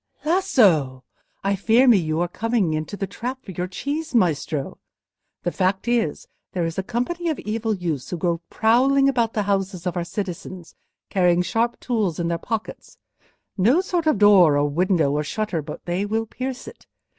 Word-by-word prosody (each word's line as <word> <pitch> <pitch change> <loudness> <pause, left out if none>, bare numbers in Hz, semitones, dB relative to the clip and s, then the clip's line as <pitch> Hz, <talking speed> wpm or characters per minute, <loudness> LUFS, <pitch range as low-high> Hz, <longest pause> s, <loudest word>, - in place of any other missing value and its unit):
"Lasso! 200 - +3 0.4
I 200 +1 +1
fear 225 +7 +3
me 235 -4 +7
you 160 -1 -1
are 175 - +1
come 230 +6 -3
into 160 -3 0
the 195 - -2
trap 250 +7 -6
for - - -7
your 180 0 -3
cheese, 290 - -4
Maestro. 155 -7 0 0.6
The 175 - -1
fact 190 +4 0
is, 235 -11 0 0.3
there 175 -2 -1
is 165 +2 -3
a - - +2
company 250 - -2
of 315 - -1
evil 220 +1 -2
youths 165 -8 -3
who 175 - -3
go 170 0 -1
prowling 265 +5 +3
about 235 -5 +1
the 210 - 0
houses 195 -2 -2
of 180 - -2
our 175 - -1
citizens 180 -1 -6 0.4
carrying 180 -2 +3
sharp 230 +5 -1
tools 210 -10 -1
in 170 -1 -1
their 170 0 -1
pockets;—no 225 - -3
sort 350 -4 -2
of 305 - +3
door, 190 -7 +6
or 145 0 +2
window, 165 -1 +1
or 150 +1 0
shutter, 200 0 -2
but 150 +1 -9
they 175 +3 -1
will 225 +2 -1
pierce 255 +2 -6
it. - - -13
195 Hz, 180 wpm, -23 LUFS, 170-235 Hz, 0.6 s, me